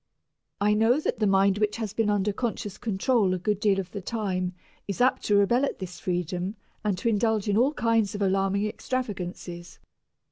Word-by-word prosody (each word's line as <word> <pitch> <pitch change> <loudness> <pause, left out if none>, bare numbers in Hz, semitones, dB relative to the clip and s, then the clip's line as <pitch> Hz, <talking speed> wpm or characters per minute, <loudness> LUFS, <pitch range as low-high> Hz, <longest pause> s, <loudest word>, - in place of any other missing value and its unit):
I 205 +1 +3
know 225 +6 +3
that 310 - -2
the 215 - +2
mind 195 +1 +3
which 210 -1 +1
has 220 -3 -4
been 225 -2 +1
under 205 0 +1
conscious 210 -3 -3
control 210 -2 +1
a - - -2
good 205 +2 -1
deal 200 -2 +2
of 185 -1 -5
the 200 - -5
time 185 -4 -2 0.3
is 200 - -4
apt 255 +1 +3
to 205 - +3
rebel 220 +6 +4
at 280 - -1
this 180 -2 -7
freedom 180 +2 -2 0.3
and 205 -3 0
to 230 - -2
indulge 220 -1 +1
in 205 - +2
all 265 +7 +3
kinds 225 -4 +1
of 205 - -4
alarming 195 +1 +1
extravagances. 185 -7 -5
205 Hz, 190 wpm, -27 LUFS, 190-220 Hz, 0.3 s, rebel